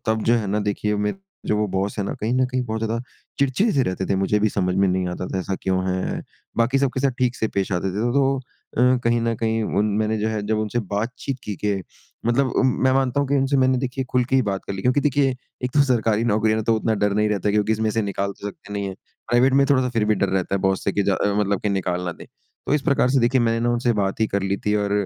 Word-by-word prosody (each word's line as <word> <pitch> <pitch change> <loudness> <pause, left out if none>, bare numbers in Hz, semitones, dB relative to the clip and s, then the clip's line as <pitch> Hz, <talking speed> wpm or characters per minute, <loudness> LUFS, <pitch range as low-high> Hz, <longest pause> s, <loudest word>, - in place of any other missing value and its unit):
तब 110 0 +1
जो 120 - +4
है 110 -3 -2
ना 100 +2 0
देखिए, 105 +1 -1
मेरे 105 - -1 0.3
जो 105 - +1
वो 105 0 +1
बॉस 95 +2 -2
हैं 100 - 0
ना, - - -3
कहीं 110 +3 -1
न 130 0 +3
कहीं 130 0 -1
बहुत 110 -1 -3
ज़्यादा 115 +1 -1 0.4
चिड़चिड़े 140 - +2
से 135 - +3
रहते 95 -3 -2
थे, 100 - +1
मुझे 95 +2 +1
भी 110 - +3
समझ 90 -3 -1
में 95 +1 +3
नहीं 90 0 0
आता 90 +1 -4
था 95 - -2
ऐसा 95 +1 -2
क्यों 95 -1 +1
है? 95 0 -2 0.3
बाकी 120 +4 +2
सब 140 -1 +2
के 130 - -1
साथ 135 0 +2
ठीक 125 -1 +1
से 110 - -1
पेश 100 0 0
आते 90 +1 0
थे, 115 +4 0
तो 135 0 +2 0.4
अ, 125 +2 +4
कहीं 115 0 +2
न 115 0 0
कहीं 110 0 0 0.2
उन 105 - +3
मैंने 110 0 0
जो 110 +1 0
है 110 -1 -2
जब 110 0 0
उनसे 110 +2 -1 0.2
बातचीत 125 +5 -3
की, 105 - -3
कि 100 -2 -1 0.4
मतलब 125 +3 +3
उम, 130 - +4 0.2
मैं 130 - +4
मानता 135 +1 +1
हूँ 140 - -1
कि 140 - +1
उनसे 135 +1 +2
मैंने 130 -1 +3
देखिए 130 +1 -3
खुल 125 -1 +2
के 135 +2 +1
ही 130 - +4
बात 100 -3 -3
कर - - -3
ली। 95 -1 -5
क्योंकि 125 +3 +3
देखिए, 140 -2 +2 0.3
एक 125 - -1
तो 145 - +6
सरकारी 115 -4 +1
नौकरी 110 -1 +2
है - - +1
ना, 110 - -1
तो 115 +1 +2
उतना 110 0 0
डर 105 - +2
नहीं 105 +1 +2
रहता 105 -1 0
क्योंकि 105 +1 +2
इसमें 110 0 0
से 110 0 0
निकाल 100 0 -2
तो - - -5
सकते 100 0 -11
नहीं 100 -1 -2
है, 95 - -5 0.3
प्राइवेट 125 +2 +4
में 140 0 +5
थोड़ा-सा 130 -2 +3
फिर 115 -3 +1
भी 105 0 +3
डर 100 -1 0
रहता 95 0 -1
है 100 - 0
बॉस 95 0 0
से 100 - +1
कि 100 - +1
जा 100 0 +2
अ, 100 +2 0
मतलब 100 -2 0
कि 105 - -1
निकाल 90 -2 -1
ना 90 - -2
दें। - - -13 0.4
तो - - +2
इस 150 - +1
प्रकार 140 -4 +2
से 135 -1 +3
देखिए 125 +2 +3
मैंने 115 -1 +1
ना 120 +1 +1
उनसे 120 0 +1
बात 100 -1 -1
ही 110 - +4
कर 100 -2 -1
ली 100 0 0
थी, 105 - +2
और 100 -1 0
110 Hz, 290 wpm, -22 LUFS, 100-125 Hz, 0.4 s, तो